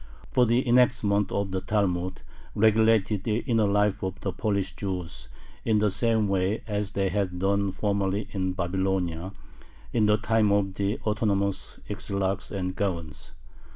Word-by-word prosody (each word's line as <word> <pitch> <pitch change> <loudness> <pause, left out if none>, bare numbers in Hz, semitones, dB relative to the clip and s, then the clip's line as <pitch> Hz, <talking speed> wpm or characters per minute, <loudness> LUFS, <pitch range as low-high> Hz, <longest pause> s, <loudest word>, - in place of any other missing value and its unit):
For 125 -1 +4
the 120 +3 +2
enactments 120 -5 +3
of 100 -1 -1
the 95 0 -2
Talmud 95 -3 -1 0.3
regulated 110 -2 +3
the 110 +1 0
inner 115 -5 +2
life 105 0 +2
of 95 -1 -4
the 95 - -2
Polish 100 0 -1
Jews 90 -4 -5 0.3
in 110 -2 +2
the 105 -1 +2
same 110 0 +2
way 95 +2 0
as 105 -1 -3
they 95 -1 +1
had 95 -2 -1
done 100 +1 +1
formerly 100 +1 -1
in 95 -2 -1
Babylonia, 90 -1 -1 0.6
in 110 -3 +3
the 105 0 +4
time 110 -1 +2
of 100 -1 +1
the 100 +2 -1
autonomous 100 -3 -1
Exilarchs 100 -2 -2
and 90 -2 -3
Gaons. 85 -7 -4
100 Hz, 150 wpm, -26 LUFS, 95-105 Hz, 0.6 s, For